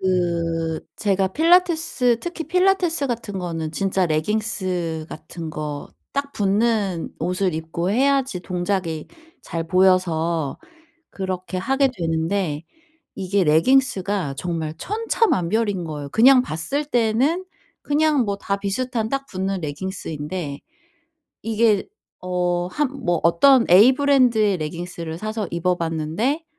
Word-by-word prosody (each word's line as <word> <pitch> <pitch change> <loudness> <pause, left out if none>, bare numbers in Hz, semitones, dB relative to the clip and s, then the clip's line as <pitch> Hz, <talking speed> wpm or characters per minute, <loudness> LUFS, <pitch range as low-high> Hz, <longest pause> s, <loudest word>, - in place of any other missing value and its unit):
그 170 -3 0 0.2
제가 195 -2 +1
필라테스 320 - +3
특히 345 -2 -5
필라테스 360 -4 +2
같은 225 -5 -4
거는 165 -3 -4
진짜 190 +1 0
레깅스 175 -2 -1
같은 165 -2 -8
거 150 -2 -5 0.3
딱 280 0 -2
붙는 205 -3 0
옷을 180 +1 0
입고 165 +3 -3
해야지 265 -4 +1
동작이 180 -3 -2 0.3
잘 165 -1 -4
보여서 170 -5 +2 0.5
그렇게 185 -1 -4
하게 270 +6 +2
되는데 165 -1 -1 0.5
이게 190 0 0
레깅스가 190 - +2
정말 160 -1 -3
천차만별인 220 - 0
거예요. 150 -3 -6
그냥 255 +3 +6
봤을 255 - -2
때는 255 +8 +1 0.4
그냥 295 -3 +2
뭐 200 -1 -2
다 200 0 -2
비슷한 225 +3 -2
딱 275 +1 -2
붙는 190 0 -3
레깅스인데 150 -1 -5 0.9
이게 220 -2 +2 0.3
어 180 -1 -1
한 295 -3 0 0.2
뭐 175 -2 +1
어떤 235 +10 +5
A 215 +8 +8
브랜드의 250 -8 +3
레깅스를 165 +1 -5
사서 215 -1 -3
입어봤는데 170 - -1
190 Hz, 250 characters per minute, -22 LUFS, 170-245 Hz, 0.9 s, A